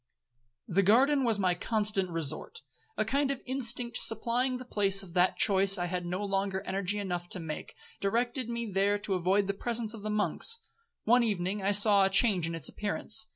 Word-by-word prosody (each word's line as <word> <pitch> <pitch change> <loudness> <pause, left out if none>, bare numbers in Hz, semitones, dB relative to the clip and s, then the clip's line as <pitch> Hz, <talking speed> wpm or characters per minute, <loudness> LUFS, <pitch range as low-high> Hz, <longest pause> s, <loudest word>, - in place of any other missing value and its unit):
'The 190 +3 +2
garden 265 +8 +3
was 230 -4 +1
my 185 -3 +1
constant 205 0 -1
resort,—a 175 - -5
kind 275 +5 0
of 275 -2 -2
instinct 245 -2 0
supplying 240 +3 0
the 255 - -10
place 195 -4 +1
of 175 -3 -13
that 180 +1 +2
choice 195 0 +4
I 175 - -2
had 180 0 -4
no 185 +4 -3
longer 195 -1 -2
energy 195 +1 -2
enough 175 -3 -4
to - - -4
make, 160 -2 -7 0.2
directed 240 +4 -1
me 235 0 -3
there 200 0 0
to 205 -1 -4
avoid 190 +3 +1
the 200 - -2
presence 230 +1 -1
of 220 - -9
the 215 - -5
monks. 210 - 0 0.5
One 245 +3 +4
evening 200 -3 -2
I 195 +1 +1
saw 205 -1 +6
a 195 - +2
change 195 -4 +2
in 165 - -4
its 165 - -1
appearance. 220 +1 -2
205 Hz, 190 wpm, -29 LUFS, 190-235 Hz, 0.5 s, saw